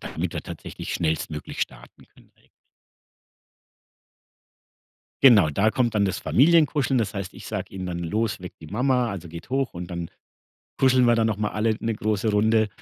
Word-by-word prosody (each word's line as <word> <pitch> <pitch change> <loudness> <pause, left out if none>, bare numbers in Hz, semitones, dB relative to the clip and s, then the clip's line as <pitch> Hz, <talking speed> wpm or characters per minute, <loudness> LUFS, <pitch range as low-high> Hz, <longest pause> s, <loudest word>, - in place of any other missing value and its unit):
damit - - -4
wir - - -4
tatsächlich - - -7
schnellstmöglich 80 -2 -3
starten - - -6
können - - -24
direkt. - - -30 2.8
Genau, 105 - +7
da 100 +9 +2
kommt 120 -2 0
dann 105 -1 +3
das 95 -1 -1
Familienkuscheln 145 -3 +3
das 105 -2 -1
heißt, 100 -2 -5
ich - - -11
sage - - -5
ihnen 95 -1 -5
dann: 85 -1 -4
„Los, 105 +5 -1
weck 90 0 -9
die 80 - -10
Mama, 125 - +1
also, 95 -5 -6
geht 85 +7 -10
hoch“, 135 0 0
und 90 -1 -6
dann 85 -2 -5 0.7
kuscheln 130 -2 +4
wir 120 -1 +4
da 115 - +2
noch 110 -2 0
mal 105 0 0
alle 110 +1 0
ne 115 - -1
große 110 0 -1
Runde. 110 +1 +3
105 Hz, 175 wpm, -24 LUFS, 90-120 Hz, 2.8 s, Genau